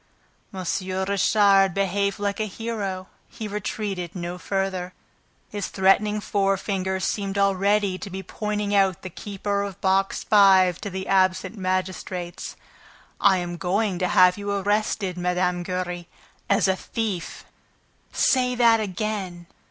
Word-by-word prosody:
M. 190 Hz, -3 st, -6 dB, 0.4 s
Richard 195 Hz, -1 st, +4 dB
behaved 200 Hz, 0 st, 0 dB
like 200 Hz, 0 st, -2 dB
a 215 Hz, -, 0 dB
hero. 200 Hz, -3 st, -4 dB, 0.2 s
He 225 Hz, -3 st, -6 dB
retreated 200 Hz, -3 st, -4 dB
no 175 Hz, 0 st, -5 dB
farther. 185 Hz, 0 st, -2 dB, 0.5 s
His 205 Hz, -1 st, -4 dB
threatening 205 Hz, +2 st, +2 dB
forefinger 195 Hz, -2 st, -1 dB
seemed 195 Hz, +2 st, -2 dB
already 200 Hz, 0 st, +2 dB
to -, -, -7 dB
be 190 Hz, +1 st, -6 dB
pointing 210 Hz, +1 st, -3 dB
out 195 Hz, -3 st, +2 dB
the 185 Hz, -, -6 dB
keeper 200 Hz, +2 st, -3 dB
of 200 Hz, -1 st, -5 dB
Box 195 Hz, 0 st, +1 dB
Five 190 Hz, -4 st, +5 dB
to 205 Hz, -, -4 dB
the 190 Hz, 0 st, -5 dB
absent 185 Hz, +1 st, +2 dB
magistrates. 185 Hz, -1 st, -3 dB, 0.6 s
"I 200 Hz, -3 st, +5 dB
am 175 Hz, -1 st, -4 dB
going 190 Hz, +1 st, 0 dB
to 180 Hz, -, +1 dB
have 180 Hz, +2 st, +5 dB
you 205 Hz, 0 st, -4 dB
arrested, 200 Hz, -2 st, -1 dB
Mme. 180 Hz, 0 st, 0 dB
Giry, 180 Hz, -1 st, -4 dB, 0.4 s
as -, -, +3 dB
a 190 Hz, -, +2 dB
thief!" 205 Hz, -3 st, -4 dB, 0.7 s
"Say 250 Hz, -1 st, +2 dB
that 230 Hz, -2 st, +5 dB
again!" 195 Hz, -3 st, -3 dB
195 Hz, 130 wpm, -24 LUFS, 185-205 Hz, 0.7 s, Five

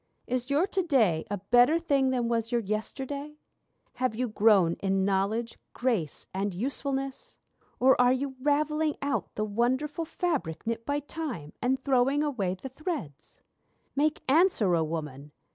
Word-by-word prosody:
Is 250 Hz, +1 st, -2 dB
your 290 Hz, +6 st, +3 dB
to 390 Hz, -1 st, -1 dB
day 230 Hz, -, +2 dB
a 205 Hz, -, -2 dB
better 245 Hz, -, +4 dB
thing 280 Hz, -5 st, +2 dB
than 245 Hz, -2 st, 0 dB
was 230 Hz, 0 st, -1 dB
your 240 Hz, -1 st, +2 dB
yesterday? 270 Hz, +8 st, -4 dB, 0.6 s
Have 255 Hz, -3 st, 0 dB
you 250 Hz, +2 st, -1 dB
grown 205 Hz, -5 st, +4 dB
in 195 Hz, -1 st, +1 dB
knowledge, 200 Hz, +4 st, -1 dB
grace, 225 Hz, -, -1 dB
and 195 Hz, 0 st, -2 dB
usefulness? 275 Hz, -, -3 dB, 0.4 s
Or 265 Hz, +1 st, +6 dB
are 250 Hz, 0 st, +5 dB
you 265 Hz, +1 st, -1 dB
ravelling 300 Hz, +2 st, +1 dB
out 280 Hz, 0 st, -2 dB
the 215 Hz, -, -1 dB
wonderful 260 Hz, +9 st, 0 dB
fabric 305 Hz, -, -2 dB
knit 230 Hz, 0 st, -3 dB
by 290 Hz, 0 st, 0 dB
Time, 275 Hz, -, -6 dB
And 265 Hz, +2 st, 0 dB
throwing 270 Hz, +2 st, +3 dB
away 205 Hz, -11 st, -1 dB
the 230 Hz, -, -8 dB
threads? 260 Hz, -, -6 dB, 0.5 s
Make 295 Hz, +2 st, +1 dB
answer, 270 Hz, -, +4 dB
O 165 Hz, -, +2 dB
Woman! 150 Hz, -3 st, -5 dB
250 Hz, 150 wpm, -28 LUFS, 200-285 Hz, 0.6 s, Or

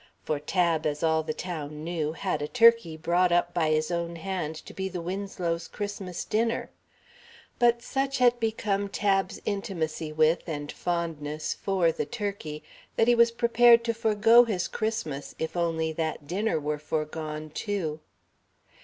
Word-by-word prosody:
For 150 Hz, -, -1 dB
Tab, 165 Hz, 0 st, +1 dB
as 150 Hz, +1 st, -3 dB
all 160 Hz, -1 st, +3 dB
the 155 Hz, 0 st, -3 dB
town 155 Hz, -3 st, -5 dB
knew, 160 Hz, -2 st, -2 dB
had 185 Hz, 0 st, -2 dB
a 150 Hz, -, -2 dB
turkey 230 Hz, -7 st, +4 dB
brought 175 Hz, +3 st, +2 dB
up 175 Hz, 0 st, +2 dB
by 165 Hz, -3 st, +1 dB
his 155 Hz, +2 st, +1 dB
own 170 Hz, 0 st, -2 dB
hand 170 Hz, -3 st, -3 dB
to -, -, -10 dB
be 190 Hz, 0 st, -3 dB
the 180 Hz, -1 st, -5 dB
Winslows' 175 Hz, -2 st, -3 dB
Christmas 205 Hz, -4 st, -5 dB
dinner, 230 Hz, +2 st, 0 dB, 0.9 s
but 235 Hz, -1 st, +3 dB
such 270 Hz, +1 st, -1 dB
had 245 Hz, -1 st, +4 dB
become 210 Hz, -3 st, -1 dB
Tab's 195 Hz, -2 st, 0 dB
intimacy 170 Hz, -7 st, -3 dB
with 155 Hz, +3 st, +2 dB
and 145 Hz, -2 st, -4 dB
fondness 155 Hz, -3 st, -3 dB
for 185 Hz, -4 st, +1 dB
the -, -, -3 dB
turkey 200 Hz, -10 st, -5 dB, 0.3 s
that 225 Hz, -, +3 dB
he 240 Hz, -, +6 dB
was 235 Hz, 0 st, +5 dB
prepared 235 Hz, 0 st, +5 dB
to 230 Hz, 0 st, 0 dB
forego 225 Hz, +1 st, +5 dB
his 205 Hz, -7 st, -1 dB
Christmas 215 Hz, -11 st, -3 dB
if 160 Hz, -, -4 dB
only 165 Hz, -2 st, 0 dB
that 160 Hz, -2 st, -3 dB
dinner 185 Hz, +1 st, 0 dB
were 150 Hz, 0 st, -2 dB
foregone, 155 Hz, 0 st, -4 dB
too. 165 Hz, -5 st, -3 dB
175 Hz, 155 wpm, -27 LUFS, 155-210 Hz, 0.9 s, he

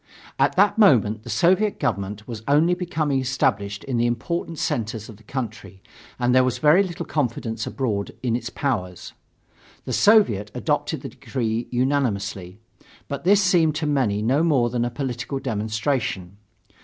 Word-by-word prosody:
At -, -, +3 dB
that 205 Hz, +3 st, +3 dB
moment 110 Hz, -, +4 dB
the 120 Hz, -, -11 dB
Soviet 185 Hz, -, +2 dB
government 105 Hz, -5 st, -3 dB
was 115 Hz, -3 st, -6 dB
only 155 Hz, +5 st, +4 dB
becoming 160 Hz, -6 st, -1 dB
established 105 Hz, -6 st, -1 dB
in 130 Hz, -3 st, -2 dB
the 120 Hz, +1 st, +2 dB
important 165 Hz, +8 st, -3 dB
centers 110 Hz, -4 st, -3 dB
of 110 Hz, -, -11 dB
the 110 Hz, -, -20 dB
country 110 Hz, -6 st, -6 dB, 0.4 s
and 120 Hz, 0 st, +1 dB
there 130 Hz, 0 st, +5 dB
was 130 Hz, -1 st, 0 dB
very 155 Hz, +5 st, +5 dB
little 175 Hz, -3 st, -4 dB
confidence 115 Hz, -5 st, -2 dB
abroad 110 Hz, -7 st, -2 dB
in 120 Hz, -2 st, +1 dB
its 120 Hz, -, -4 dB
power. 105 Hz, -11 st, -2 dB, 0.9 s
The -, -, -3 dB
Soviet 200 Hz, -, +4 dB
adopted -, -, -1 dB
the -, -, -5 dB
decree 115 Hz, -2 st, -3 dB
unanimously. 105 Hz, -8 st, -1 dB, 0.5 s
But 140 Hz, +4 st, -5 dB
this 200 Hz, +2 st, +5 dB
seemed 170 Hz, -4 st, +3 dB
to 155 Hz, 0 st, -2 dB
many 125 Hz, -9 st, +1 dB
no 130 Hz, +7 st, +2 dB
more 135 Hz, -8 st, +2 dB
than 120 Hz, -1 st, 0 dB
a -, -, -1 dB
political 125 Hz, 0 st, -4 dB
demonstration. 110 Hz, -4 st, -2 dB
125 Hz, 155 wpm, -23 LUFS, 110-150 Hz, 0.9 s, there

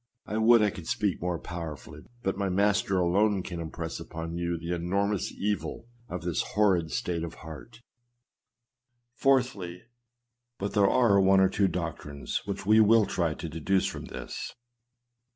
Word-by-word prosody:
I 105 Hz, -, -3 dB
would 115 Hz, 0 st, +6 dB
I 105 Hz, -, +2 dB
could 85 Hz, -3 st, -9 dB
speak 100 Hz, -3 st, 0 dB
more 90 Hz, 0 st, -1 dB
powerfully, 80 Hz, -4 st, -7 dB, 0.2 s
but 95 Hz, -, 0 dB
my 100 Hz, 0 st, -1 dB
Master 100 Hz, 0 st, +2 dB
alone 95 Hz, +3 st, +2 dB
can 90 Hz, -2 st, -6 dB
impress 80 Hz, 0 st, -5 dB
upon 80 Hz, 0 st, -6 dB
you 85 Hz, 0 st, -1 dB
the 85 Hz, +2 st, -4 dB
enormous 100 Hz, +3 st, 0 dB
evil 100 Hz, -3 st, -3 dB, 0.2 s
of 90 Hz, -1 st, -5 dB
this 85 Hz, -2 st, 0 dB
horrid 95 Hz, -6 st, +2 dB
state 90 Hz, -7 st, -2 dB
of 85 Hz, -1 st, -6 dB
heart. 115 Hz, +9 st, -10 dB, 1.4 s
IV. 130 Hz, -1 st, +4 dB, 1.0 s
But 100 Hz, +1 st, -3 dB
there 100 Hz, -2 st, +4 dB
are 100 Hz, -6 st, +4 dB
one 95 Hz, 0 st, +5 dB
or 95 Hz, 0 st, +5 dB
two 100 Hz, 0 st, +2 dB
doctrines 80 Hz, -6 st, -4 dB
which 100 Hz, -1 st, -4 dB
we 110 Hz, +2 st, +6 dB
will 110 Hz, 0 st, +6 dB
try 85 Hz, -4 st, -1 dB
to -, -, -6 dB
deduce 85 Hz, +5 st, 0 dB
from -, -, -4 dB
this. -, -, -7 dB
95 Hz, 155 wpm, -28 LUFS, 85-105 Hz, 1.4 s, would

